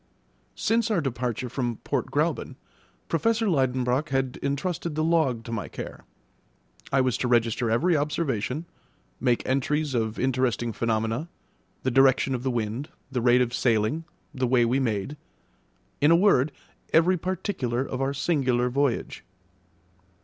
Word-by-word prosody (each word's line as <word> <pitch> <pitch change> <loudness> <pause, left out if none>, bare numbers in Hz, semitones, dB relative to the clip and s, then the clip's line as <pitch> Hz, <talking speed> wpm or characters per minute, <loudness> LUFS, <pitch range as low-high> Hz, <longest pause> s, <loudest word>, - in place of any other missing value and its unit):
Since 225 +1 +1
our 210 -5 +2
departure 125 -4 -2
from 120 -1 -2
Port - - -1
Gräuben, - - -1 0.5
Professor 225 +7 +1
Liedenbrock 130 -3 +1
had 135 -2 -1
entrusted 150 +3 -2
the 155 - 0
log 155 -8 +2
to 115 - -8
my 115 -3 -3
care; - - -8 0.9
I 135 - +4
was 130 -2 +1
to 125 - 0
register 120 -1 +2
every 145 +10 +2
observation, 145 -2 -1 0.5
make 120 -2 +1
entries 145 +2 0
of 110 -2 -1
interesting 125 -3 0
phenomena, 115 +7 -1 0.5
the 130 - +1
direction 135 +1 +4
of 125 - -2
the 130 - -1
wind, 120 +4 -2 0.2
the 125 -2 -1
rate 120 +1 +5
of 120 0 -4
sailing, 115 +7 +1 0.3
the 130 -1 0
way 120 -1 +4
we 125 +3 +1
made 115 +2 -2 0.8
in 145 - +5
a 165 - +7
word, 170 -7 +4 0.4
every 170 +3 +4
particular 175 - -2
of 130 -1 -4
our 135 +1 +1
singular 130 -5 +1
voyage. 140 -2 -1
130 Hz, 140 wpm, -26 LUFS, 120-150 Hz, 0.9 s, a